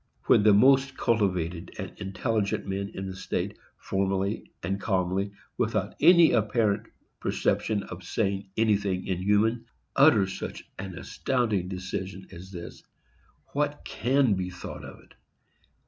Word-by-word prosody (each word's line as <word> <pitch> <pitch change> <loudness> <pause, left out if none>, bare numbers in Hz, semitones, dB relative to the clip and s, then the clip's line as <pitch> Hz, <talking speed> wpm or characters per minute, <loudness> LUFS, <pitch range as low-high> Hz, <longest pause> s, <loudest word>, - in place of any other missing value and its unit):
_ - - -25
When - - +6
the 105 0 +6
most 135 +6 +5
cultivated 90 -7 0
and - - -6
intelligent 100 +2 -1
men 100 +1 -3
in 95 - -4
the 95 -1 -5
state 95 - -3 0.2
formally, 95 +1 -1 0.3
calmly 95 -1 0
and 100 - -11 0.3
without - - 0
any 170 -2 +7
apparent 105 -1 +1 0.3
perception 105 -2 0
of 90 0 -8
saying 95 +1 -1
anything 100 -4 +1
inhuman, 105 +5 +1 0.3
utter 135 -8 +6
such 95 - -6 0.2
an 95 -2 -6
astounding 110 -5 -1
decision 95 +1 -5
as 95 +2 -10
this, 85 -2 -8 0.7
what 145 0 -1
can 130 -2 +2
be 95 -1 -2
thought 90 - -8
of - - -10
it? - - -21
100 Hz, 130 wpm, -27 LUFS, 95-110 Hz, 0.7 s, any